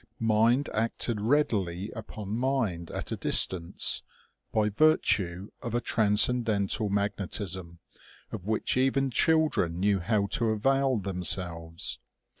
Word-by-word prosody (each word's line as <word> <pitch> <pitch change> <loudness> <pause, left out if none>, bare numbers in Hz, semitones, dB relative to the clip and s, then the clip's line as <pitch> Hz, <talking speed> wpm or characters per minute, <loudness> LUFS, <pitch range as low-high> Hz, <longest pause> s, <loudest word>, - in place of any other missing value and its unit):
Mind 115 +4 +2
acted 115 0 -1
readily 105 - 0
upon 110 -3 -8
mind 115 -10 -1
at - - -6
a - - -1
dis - - +5
tance, 85 -3 -1 0.5
by 110 -1 +1
virtue 100 - +1
of 120 -2 -4
a - - +2
transcendental 110 -2 +2
magnetism, 95 -3 -3 0.5
of 105 -5 -6
which 110 0 0
even 135 +1 +1
children 155 - +1
knew 100 0 +2
how 100 +2 0
to 115 -2 0
avail 135 +4 +1
themselves. 90 -3 -2
105 Hz, 115 wpm, -28 LUFS, 95-120 Hz, 0.5 s, dis